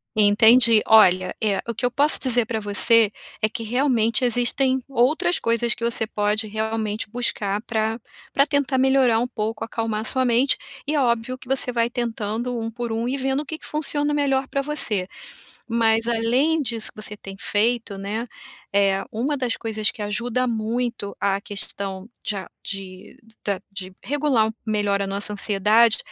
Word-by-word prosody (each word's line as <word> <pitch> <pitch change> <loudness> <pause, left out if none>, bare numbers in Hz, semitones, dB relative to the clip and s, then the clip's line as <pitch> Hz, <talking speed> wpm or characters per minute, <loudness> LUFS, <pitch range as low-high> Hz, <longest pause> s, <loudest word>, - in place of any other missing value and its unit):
Entendi. 220 +2 +6
Olha, 185 -4 +5
é, 200 -2 +1
o 235 - -2
que 230 - -8
eu 245 - +3
posso 285 +4 +4
dizer 245 -3 +3
pra 225 0 -3
você 215 +1 +5 0.3
é 215 - +2
que 225 - -6
realmente 235 -1 +1
existem 250 +2 +2
outras 275 +7 +1
coisas 235 +1 0
que - - -9
você 230 -1 0
pode 210 +1 -1
realmente 220 0 -3
buscar 210 -3 -2
pra 225 0 -2 0.3
pra 275 - +3
tentar 285 -2 0
melhorar 260 -3 +3
um 245 - -1
pouco, 220 -3 -4
acalmar 225 -1 -3
a - - -5
sua 260 +3 +2
mente, 245 +2 +3 0.3
e 305 - -1
é 295 - +2
óbvio 235 0 0
que 255 - -16
você 265 -1 +1
vai 235 -1 0
tentando 235 0 -3
um 225 0 -3
por 235 0 -5
um 225 +2 -2
e 270 +2 -1
vendo 265 +1 -1
o - - -9
que 315 +2 -6
que - - -13
funciona 295 -1 0
melhor 275 -2 0
pra 275 - -2
você, 240 -10 +1 0.6
mas 225 0 +2
além 245 +8 +1
disso 230 -3 -2
que - - -14
você 210 0 -2
tem 195 -1 -10
feito, 225 0 0
né, 205 +4 -4 0.5
eh, 195 -1 +2
uma 275 +6 -2
das 250 -3 -1
coisas 220 -1 -2
que - - -10
ajuda 235 +4 -1
muito 230 -1 -3
a 195 0 0
questão 200 0 -3
de 210 - -1
a 190 -2 -7
de 195 -1 -7 0.3
da 200 -2 -1
de 190 -2 -7
regular 275 -5 +1
um - - -3
melhor 205 -2 0
a 200 - -1
nossa 200 +2 -3
ansiedade, 210 +3 +3
230 Hz, 180 wpm, -22 LUFS, 210-250 Hz, 0.6 s, Entendi